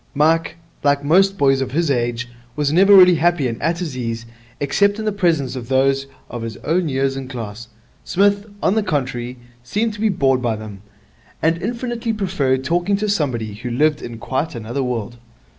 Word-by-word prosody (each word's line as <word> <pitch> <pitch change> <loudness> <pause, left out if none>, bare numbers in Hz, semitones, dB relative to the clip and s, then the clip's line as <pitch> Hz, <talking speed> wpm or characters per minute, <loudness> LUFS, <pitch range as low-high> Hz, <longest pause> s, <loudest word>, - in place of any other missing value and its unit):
Mike, 160 +4 +2 0.3
like 145 0 +2
most 195 +6 +4
boys 135 -1 +3
of 130 -1 -3
his 165 -1 +1
age, 120 -1 -1 0.3
was 145 0 0
never 195 +4 +7
really 180 -1 +9
happy 170 -5 +2
and 115 -2 -5
at 165 +2 0
his 170 -7 -4
ease 115 -2 -4 0.3
except 200 +9 +2
in 220 - -4
the 215 - +1
presence 165 -10 0
of 120 -3 -6
those 135 +1 +2 0.2
of 120 - -6
his 115 -1 -5
own 170 +1 +1
years 135 0 0
and 135 -1 -6
class. 115 -2 -7 0.4
Psmith, 200 +2 +2 0.2
on - - +3
the 220 - +2
contrary, 130 - -2 0.2
seemed 210 - -1
to 210 - -8
be 220 - +3
bored 135 -8 +2
by 120 -3 0
them, 105 -2 -9 0.6
and 165 +2 +1
infinitely 235 +1 -2
preferred 150 -11 0
talking 175 +7 +1
to 210 +1 -1
somebody 130 - -1
who 120 +4 -6
lived 150 +5 +1
in 120 -1 -7
quite 130 +6 -3
another 115 +4 -3
world. 120 -2 -3
140 Hz, 190 wpm, -20 LUFS, 125-180 Hz, 0.6 s, really